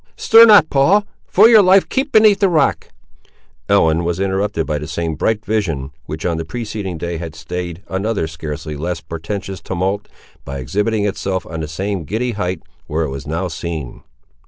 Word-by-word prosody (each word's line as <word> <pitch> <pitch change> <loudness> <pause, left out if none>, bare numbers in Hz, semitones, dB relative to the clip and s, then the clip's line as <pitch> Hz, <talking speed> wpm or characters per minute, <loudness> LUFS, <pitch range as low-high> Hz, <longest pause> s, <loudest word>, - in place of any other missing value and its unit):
"Stir 230 +1 +7
not, 205 -8 +6
Paul; 180 +10 +3 0.2
for 210 +4 +6
your 225 -2 +7
life 190 0 +5
keep 275 +2 -1
beneath 215 -2 +5
the 195 - +3
rock!" 155 -5 +1 0.8
Ellen 80 +1 +3
was 85 +1 -2
interrupted 95 -3 -1
by 75 -1 -2
the 75 - -6
same 80 +1 -3
bright 105 +8 -1
vision, 85 -11 -2 0.2
which 75 +2 -6
on 85 -2 0
the 80 - -3
preceding 105 -2 -5
day 85 +1 -4
had 80 -1 -7
stayed 85 +2 -6
another 100 0 -1
scarcely 75 -1 -6
less 85 +3 -3
portentous 95 +5 -6
tumult, 95 +3 -2 0.4
by 70 -1 -6
exhibiting 105 - -1
itself 95 -2 -2
on 80 0 -6
the 80 - -3
same 95 +3 -3
giddy 120 - -2
height, 90 -5 -3 0.2
where 80 +2 -1
it 75 - -2
was 70 +1 -7
now 85 +5 -2
seen. 80 -6 -6
90 Hz, 180 wpm, -18 LUFS, 80-110 Hz, 0.8 s, Stir